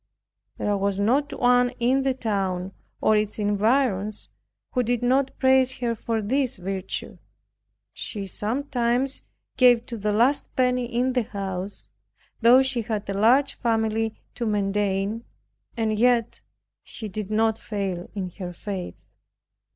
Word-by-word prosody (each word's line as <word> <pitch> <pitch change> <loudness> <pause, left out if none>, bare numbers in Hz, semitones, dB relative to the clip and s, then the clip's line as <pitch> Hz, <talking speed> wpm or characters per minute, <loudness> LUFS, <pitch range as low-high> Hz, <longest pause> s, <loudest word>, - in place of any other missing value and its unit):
There 205 - 0
was 200 0 -1
not 260 +8 +2
one 245 0 +4
in 255 +3 +2
the 265 -1 0
town, 195 -6 -2 0.3
or 215 - +4
its 210 0 0
environs, 210 0 +1 0.4
who 250 - +1
did 245 0 -1
not 265 +2 +1
praise 260 -1 +4
her 240 -1 -1
for 225 -1 -2
this 265 +4 +1
virtue. 190 +1 -4 0.7
She 205 -3 -4
sometimes 245 +4 -1 0.4
gave 245 -2 +5
to 230 -3 -6
the 210 +1 0
last 240 +7 +2
penny 250 -1 +2
in 245 +2 0
the 250 - +2
house, 195 -2 -5 0.5
though 245 +3 +7
she 265 -3 0
had 215 -2 -3
a - - -2
large 235 +8 +4
family 225 -1 0 0.2
to 235 - -3
maintain, 205 +1 0 0.5
and 220 -1 0
yet 240 -1 +2 0.4
she 220 - -7
did 210 0 -5
not 220 +1 +1
fail 195 -4 -4
in 185 -3 -3
her 180 -2 -5
faith. 185 0 -5
225 Hz, 135 wpm, -25 LUFS, 205-250 Hz, 0.7 s, though